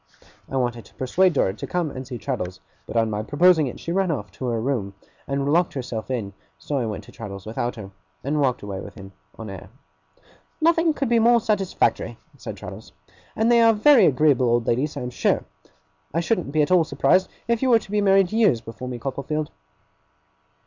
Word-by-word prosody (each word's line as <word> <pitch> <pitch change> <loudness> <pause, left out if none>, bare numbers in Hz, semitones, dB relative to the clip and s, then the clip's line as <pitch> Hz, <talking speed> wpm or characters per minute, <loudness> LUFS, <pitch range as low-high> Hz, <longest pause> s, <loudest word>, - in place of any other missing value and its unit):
I 135 - -2
wanted 120 -2 -1
to - - -20
persuade 180 +8 +2
Dora 95 -9 +1
to 105 - -7
come 175 -4 -1
and 130 -1 -7
see 125 -2 -5
Traddles, 95 -3 -4 0.3
but - - -3
on 115 -1 +2
my 105 0 -2
proposing 160 +5 +4
it 125 - -7
she 170 - -5
ran 190 +1 +1
off 105 - -3
to 130 - -7
her 120 -1 0
own 110 - -3
room 115 -8 -2 0.3
and 140 +1 0
locked 175 +1 +2
herself 120 -4 -5
in; 110 -6 -3 0.2
so 135 - -3
I 120 - -1
went 105 - -5
to - - -15
Traddles 100 -3 -8
without 120 +2 -3
her, 100 -4 -9 0.3
and 145 +2 0
walked 130 -5 0
away 100 -2 -5
with 100 - -9
him 95 -3 -11 0.3
on 115 - -7
air. 95 0 -10 0.9
'Nothing 330 -1 +3
could 275 - -1
be 235 0 +3
more 235 +1 +5
satisfactory,' 210 -4 0 0.2
said - - -8
Traddles; - - -10 0.4
'and 225 +2 +2
they 235 -1 +6
are 230 -1 +6
very 225 -1 +6
agreeable 135 -3 +3
old 120 0 +2
ladies, 145 +5 0
I - - -3
am 125 0 -4
sure. - - +1 0.7
I - - +3
shouldn't 170 -3 -1
be 155 0 +3
at 145 - -2
all 180 -2 +6
surprised 185 +3 +2 0.2
if 235 -1 +1
you 265 - +2
were 235 - +7
to 205 - -9
be 210 0 +1
married 195 -2 +4
years 215 - +3
before 115 +3 -8
me, 125 -1 -4
Copperfield. 140 +5 -3
140 Hz, 210 wpm, -23 LUFS, 115-190 Hz, 0.9 s, were